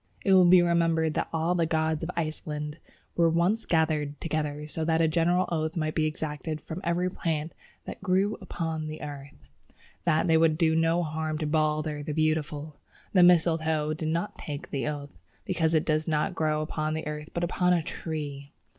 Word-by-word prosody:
It 195 Hz, -, +5 dB
will 185 Hz, -2 st, +7 dB
be 180 Hz, -1 st, +7 dB
remembered 165 Hz, -2 st, +2 dB
that -, -, -2 dB
all 165 Hz, +2 st, +1 dB
the 170 Hz, -2 st, +1 dB
gods 160 Hz, -1 st, 0 dB
of 165 Hz, -, -3 dB
Iceland 155 Hz, -2 st, -4 dB, 0.4 s
were 170 Hz, -1 st, +4 dB
once 175 Hz, +7 st, +1 dB
gathered 155 Hz, -3 st, +1 dB
together 150 Hz, -2 st, -2 dB
so 160 Hz, +1 st, -3 dB
that 160 Hz, 0 st, +2 dB
a 165 Hz, -, +4 dB
general 175 Hz, +3 st, +2 dB
oath 160 Hz, 0 st, -1 dB
might 155 Hz, -1 st, -1 dB
be 155 Hz, -1 st, +1 dB
exacted 155 Hz, 0 st, -4 dB
of 160 Hz, -, -3 dB
every 175 Hz, +2 st, +1 dB
plant 165 Hz, -3 st, -2 dB, 0.3 s
"that -, -, -8 dB
grew 190 Hz, +3 st, +2 dB
upon 160 Hz, -4 st, -3 dB
the 155 Hz, 0 st, -7 dB
earth," 140 Hz, -1 st, -8 dB, 0.7 s
that 160 Hz, -2 st, +3 dB
they 165 Hz, -1 st, +5 dB
would 160 Hz, -1 st, +3 dB
do 160 Hz, -2 st, +3 dB
no 165 Hz, +2 st, +2 dB
harm 155 Hz, 0 st, -2 dB
to 155 Hz, -, -2 dB
Balder 155 Hz, -1 st, 0 dB
the 150 Hz, +1 st, -4 dB
Beautiful. 155 Hz, -1 st, -1 dB, 0.4 s
The 185 Hz, -, +6 dB
Mistletoe 160 Hz, -3 st, +3 dB
did 155 Hz, 0 st, -3 dB
not 170 Hz, +5 st, -2 dB
take 145 Hz, -1 st, -6 dB
the 140 Hz, -1 st, -2 dB
oath, 145 Hz, -1 st, -6 dB, 0.3 s
because 165 Hz, -3 st, +1 dB
it 155 Hz, -, +2 dB
does 155 Hz, 0 st, 0 dB
not 155 Hz, -2 st, 0 dB
grow 155 Hz, -1 st, 0 dB
upon 155 Hz, 0 st, -2 dB
the 160 Hz, -, -4 dB
earth 150 Hz, 0 st, -5 dB
but 170 Hz, -, -1 dB
upon 180 Hz, +1 st, +1 dB
a 175 Hz, -2 st, +2 dB
tree. 145 Hz, -4 st, -6 dB
160 Hz, 190 wpm, -27 LUFS, 155-170 Hz, 0.7 s, will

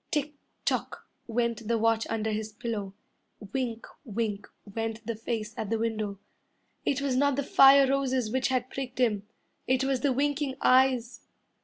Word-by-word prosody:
Tick 300 Hz, 0 st, -1 dB, 0.3 s
tock -, -, -2 dB, 0.2 s
went 235 Hz, -1 st, -1 dB
the 230 Hz, 0 st, +2 dB
watch 225 Hz, 0 st, +2 dB
under 220 Hz, -1 st, -1 dB
his 215 Hz, 0 st, -3 dB
pillow, 205 Hz, -3 st, -4 dB, 0.6 s
Wink 240 Hz, -4 st, -2 dB, 0.2 s
wink 215 Hz, -4 st, -3 dB, 0.2 s
went 225 Hz, +2 st, -4 dB
the 230 Hz, -, -2 dB
face 220 Hz, -1 st, -4 dB
at 215 Hz, -, -4 dB
the 225 Hz, -, +1 dB
window. 215 Hz, -3 st, -2 dB, 0.7 s
It 275 Hz, 0 st, 0 dB
was 270 Hz, -2 st, 0 dB
not 285 Hz, +1 st, +3 dB
the 285 Hz, -, -1 dB
fire 275 Hz, +1 st, +7 dB
roses 260 Hz, -4 st, 0 dB
which 260 Hz, +1 st, +1 dB
had 255 Hz, -1 st, -1 dB
pricked 265 Hz, -2 st, -5 dB
him, 210 Hz, -5 st, +1 dB, 0.4 s
It 260 Hz, +1 st, +2 dB
was 270 Hz, -1 st, +1 dB
the 275 Hz, +2 st, +1 dB
winking 285 Hz, +1 st, 0 dB
eyes. 255 Hz, -2 st, +3 dB
235 Hz, 160 wpm, -28 LUFS, 220-265 Hz, 0.7 s, fire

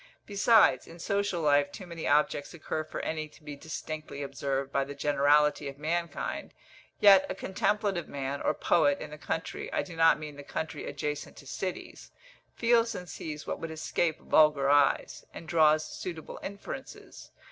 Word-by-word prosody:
Besides, 205 Hz, -, +4 dB
in 165 Hz, -, -12 dB
social 200 Hz, 0 st, -1 dB
life 145 Hz, -1 st, +3 dB
too 185 Hz, -, -9 dB
many 170 Hz, -2 st, -6 dB
objects 145 Hz, +2 st, +1 dB
occur 155 Hz, -1 st, -3 dB
for 155 Hz, -, -6 dB
any 155 Hz, -1 st, -3 dB
to 150 Hz, +1 st, -20 dB
be 150 Hz, -1 st, -7 dB
distinctly 155 Hz, -1 st, -6 dB
observed 135 Hz, 0 st, -3 dB
by 140 Hz, -, +1 dB
the 140 Hz, +1 st, -8 dB
generality 145 Hz, +1 st, +3 dB
of 135 Hz, 0 st, -7 dB
mankind; 170 Hz, +3 st, -3 dB, 0.4 s
yet 195 Hz, -2 st, +7 dB
a -, -, -3 dB
contemplative 195 Hz, -1 st, -1 dB
man, 140 Hz, 0 st, -4 dB
or -, -, +1 dB
poet, 145 Hz, -4 st, +3 dB
in -, -, -7 dB
the 150 Hz, -, -9 dB
country 165 Hz, +2 st, -4 dB
I -, -, 0 dB
do 180 Hz, -3 st, -10 dB
not 165 Hz, 0 st, +5 dB
mean 150 Hz, -1 st, -8 dB
the 145 Hz, -, -8 dB
country 160 Hz, +2 st, -5 dB
adjacent 145 Hz, +1 st, -4 dB
to -, -, -12 dB
cities 185 Hz, -2 st, -6 dB, 0.5 s
feels 230 Hz, -1 st, +3 dB
and 180 Hz, -, -6 dB
sees 150 Hz, -3 st, -6 dB
what -, -, -4 dB
would 165 Hz, -, -5 dB
escape 160 Hz, +1 st, -1 dB
vulgar 150 Hz, -3 st, +4 dB
eyes, 145 Hz, -1 st, +2 dB
and 165 Hz, -, -9 dB
draws 155 Hz, -2 st, +4 dB
suitable 165 Hz, -4 st, -7 dB
inferences. 200 Hz, +1 st, -8 dB
155 Hz, 170 wpm, -29 LUFS, 145-175 Hz, 0.5 s, yet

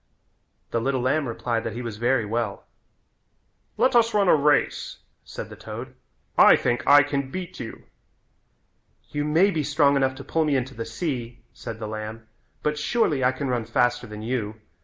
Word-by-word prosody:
The 115 Hz, -, 0 dB
little 130 Hz, +1 st, 0 dB
lamb 140 Hz, +3 st, +1 dB
replied 115 Hz, 0 st, -2 dB
that 115 Hz, -, -4 dB
he 125 Hz, -, -5 dB
was 115 Hz, -3 st, -5 dB
very 120 Hz, 0 st, +1 dB
well. 115 Hz, +2 st, -3 dB, 1.1 s
"Let 260 Hz, 0 st, +3 dB
us 230 Hz, -2 st, +4 dB
run 200 Hz, -2 st, +3 dB
a -, -, +7 dB
race," 150 Hz, 0 st, +1 dB, 0.3 s
said -, -, -8 dB
the -, -, -8 dB
toad, -, -, -8 dB, 0.5 s
"I -, -, +9 dB
think 120 Hz, 0 st, 0 dB
I 145 Hz, 0 st, +8 dB
can 140 Hz, -2 st, -2 dB
beat 185 Hz, +3 st, -6 dB
you." 115 Hz, -, -7 dB, 1.3 s
"You 145 Hz, -, -1 dB
may 165 Hz, +7 st, +3 dB
be 160 Hz, -4 st, -1 dB
strong 145 Hz, 0 st, +3 dB
enough 135 Hz, -1 st, +1 dB
to 135 Hz, -, -9 dB
pull 160 Hz, +4 st, 0 dB
me 150 Hz, -2 st, +1 dB
into 130 Hz, 0 st, -1 dB
the 115 Hz, -2 st, -5 dB
sea," 120 Hz, -1 st, -4 dB
said 115 Hz, -3 st, -7 dB
the 110 Hz, -1 st, -5 dB
lamb, 110 Hz, +1 st, -6 dB, 0.4 s
"but 150 Hz, 0 st, 0 dB
surely 155 Hz, -, +1 dB
I 125 Hz, -, +4 dB
can 135 Hz, +1 st, -4 dB
run 120 Hz, -2 st, 0 dB
faster 125 Hz, +1 st, +1 dB
than 105 Hz, 0 st, -8 dB
you. 110 Hz, -3 st, -2 dB
130 Hz, 180 wpm, -25 LUFS, 115-150 Hz, 1.3 s, I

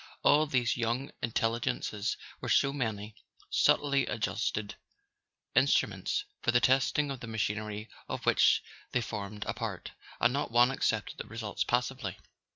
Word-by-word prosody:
All 150 Hz, +2 st, +5 dB
these 125 Hz, -4 st, +1 dB
young 120 Hz, +3 st, -1 dB
intel¬ 115 Hz, 0 st, 0 dB
ligences 110 Hz, -4 st, -2 dB, 0.2 s
were -, -, -5 dB
so 140 Hz, -1 st, +4 dB
many 110 Hz, -6 st, -3 dB, 0.4 s
subtly 140 Hz, -2 st, +3 dB
adjusted 105 Hz, 0 st, -2 dB, 0.8 s
instruments 410 Hz, 0 st, +2 dB, 0.2 s
for -, -, -1 dB
the 120 Hz, 0 st, +5 dB
testing 135 Hz, +4 st, +2 dB
of 135 Hz, -, -5 dB
the 115 Hz, -, -8 dB
machinery 110 Hz, -1 st, -2 dB, 0.2 s
of -, -, -4 dB
which -, -, +4 dB, 0.3 s
they 125 Hz, -, +2 dB
formed 105 Hz, -2 st, -5 dB
a -, -, -2 dB
part; -, -, -5 dB, 0.3 s
and 120 Hz, +1 st, +3 dB
not 140 Hz, -, -1 dB
one 120 Hz, +2 st, +5 dB
accepted 110 Hz, -5 st, -1 dB
the -, -, -4 dB
results 110 Hz, -2 st, -3 dB
passively. 125 Hz, -5 st, -1 dB
115 Hz, 145 wpm, -31 LUFS, 105-130 Hz, 0.8 s, All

